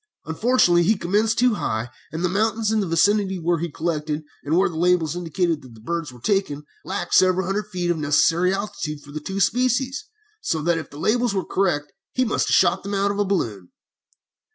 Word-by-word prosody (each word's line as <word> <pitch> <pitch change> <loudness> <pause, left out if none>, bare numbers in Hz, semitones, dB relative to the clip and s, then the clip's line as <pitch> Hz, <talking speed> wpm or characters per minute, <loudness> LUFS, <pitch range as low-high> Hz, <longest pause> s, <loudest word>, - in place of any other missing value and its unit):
Unfortunately 175 0 +3
he 210 +5 +2
commenced 210 +6 +1
too 245 -1 +4
high, 115 - -3 0.2
and 165 +3 -2
the - - +3
mountains 215 +3 0
in 220 - +2
the 200 - -1
vicinity 190 +3 +2
where 170 -1 0
he 170 +1 -3
collected, 155 -1 -3 0.2
and 155 +4 +1
where 190 - +4
the 170 - -7
labels 170 -2 +2
indicated 170 -2 -1
that 125 -4 -14
the - - -15
birds 165 +5 -4
were 125 - -14
taken, 170 - -1 0.2
lacked 195 +2 -4
several 185 0 +4
hundred 205 +3 -2
feet 180 -3 -1
of 170 - -1
the - - -5
necessary 165 +5 +3
altitude 195 -7 -4
for 145 0 -14
two 150 - -6
of 150 - -22
the 195 +1 -3
species, 255 +6 +1 0.3
so 165 - -1
that 170 0 +1
if 160 - -8
his 145 - -11
labels 235 +3 +1
were 190 - -1
correct 175 -7 -1 0.2
he 255 - +1
must 220 - 0
have - - +3
shot - - +3
them 200 +1 -4
out 200 +1 +1
of 200 - -4
a 205 - +2
balloon. 110 - -2
180 Hz, 220 wpm, -23 LUFS, 160-205 Hz, 0.3 s, too